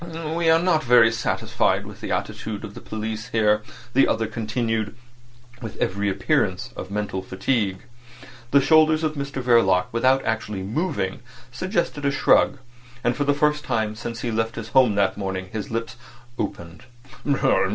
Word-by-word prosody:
"We 165 0 +1
are 160 - +6
not 165 -2 +2
very 120 -3 +6
satisfied 115 0 0
with - - -11
the - - -4
attitude 110 -1 -3
of 100 - -10
the - - -10
police 110 +1 -5
here," 105 -3 +2 0.3
the 135 - +5
other 110 0 +1
continued, 110 0 -2 0.7
with 110 -2 -7
every 100 +2 0
appearance 95 - 0
of 95 - -7
mental 100 -2 -3
fatigue. 95 +1 -1 0.7
The 140 +2 +5
shoulders 155 +2 +4
of 155 -1 0
Mr 140 -2 -4
Verloc, 115 -7 +4
without 130 +3 +2
actually 105 -3 -2
moving, 105 - -2 0.3
suggested 170 - -2
a 140 - +3
shrug. 140 0 +3 0.5
And 120 0 +1
for 145 - -1
the 145 0 +2
first 150 +1 +1
time 110 -5 -1
since 115 +1 -6
he 120 - -2
left 115 0 -1
his 110 -1 -6
home 125 -4 +4
that 100 0 +1
morning 95 -1 -4
his 110 -2 -5
lips 115 +1 -4 0.4
opened. 85 -3 -5
115 Hz, 160 wpm, -23 LUFS, 105-135 Hz, 0.7 s, are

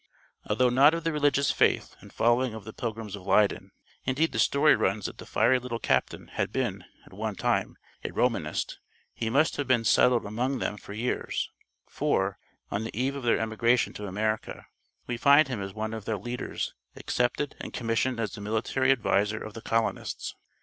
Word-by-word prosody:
Although 125 +4 +3
not 140 +6 +6
of 165 - -4
the 165 - +1
religious 145 -1 +2
faith - - +1
and - - -14
following 120 0 +2
of 110 - -8
the 110 +2 -9
Pilgrims 110 -3 -4
of 100 - -9
Leyden 100 +2 +2 0.3
indeed 140 +6 +1
the - - -3
story 150 +2 +5
runs 100 +1 0
that - - -5
the - - -9
fiery 120 +4 +3
little 125 -1 -4
captain - - 0
had - - -2
been, - - -2 0.2
at - - -17
one - - -3
time, - - 0 0.3
a - - -2
Romanist - - -1 0.3
he 110 - -2
must 140 +7 +2
have 145 - -2
been 125 -3 +3
settled 120 +1 +4
among 125 +6 -1
them - - -2
for 100 - -10
years, 115 +4 -2 0.4
for, 95 0 0 0.3
on 100 +2 -1
the 110 0 -5
eve 135 +2 0
of 140 - -5
their 120 -2 +3
emigration 115 +2 +1
to 105 - -6
America, 110 +3 -2 0.4
we 120 - -3
find 140 +3 +6
him 120 -6 -3
as 95 0 -4
one 110 +2 -4
of 110 -3 -6
their 110 - -1
leaders, 120 +5 -4 0.2
accepted 125 +4 -1
and - - -6
commissioned 115 +1 0
as 110 -4 -2
the 105 - -7
military 110 +5 +1
adviser 110 -4 +2
of 110 - -8
the 115 - -8
colonists. 115 0 -1
115 Hz, 190 wpm, -28 LUFS, 110-130 Hz, 0.4 s, not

